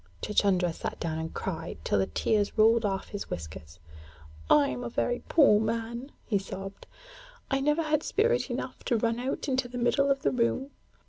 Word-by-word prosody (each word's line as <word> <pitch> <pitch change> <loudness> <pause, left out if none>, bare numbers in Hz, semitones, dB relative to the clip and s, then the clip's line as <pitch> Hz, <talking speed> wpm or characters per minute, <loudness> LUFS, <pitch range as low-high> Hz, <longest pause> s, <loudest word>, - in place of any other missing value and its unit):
Chuchundra 190 -4 +2
sat - - -5
down 160 -1 -2
and 160 0 -4
cried 165 -3 -5
till 100 - +1
the 95 - +1
tears 210 -1 0
rolled 225 +1 +5
off 195 -1 -2
his 205 - -6
whiskers. 80 -1 -7 0.7
'I 145 -1 +6
am 125 -1 -4
a 120 - -3
very 245 - -1
poor 275 -10 +6
man,' 230 +4 -3
he 205 -3 +1
sobbed. 195 0 -8 0.6
'I 270 0 +2
never 295 +4 +2
had 305 -1 +1
spirit 475 +7 +1
enough - - -5
to 240 - +2
run 230 +1 0
out 260 +4 -3
into 260 -2 0
the 245 +1 -7
middle 275 +3 +2
of 275 0 +1
the - - +2
room. 255 +3 0
225 Hz, 185 wpm, -28 LUFS, 185-265 Hz, 0.7 s, I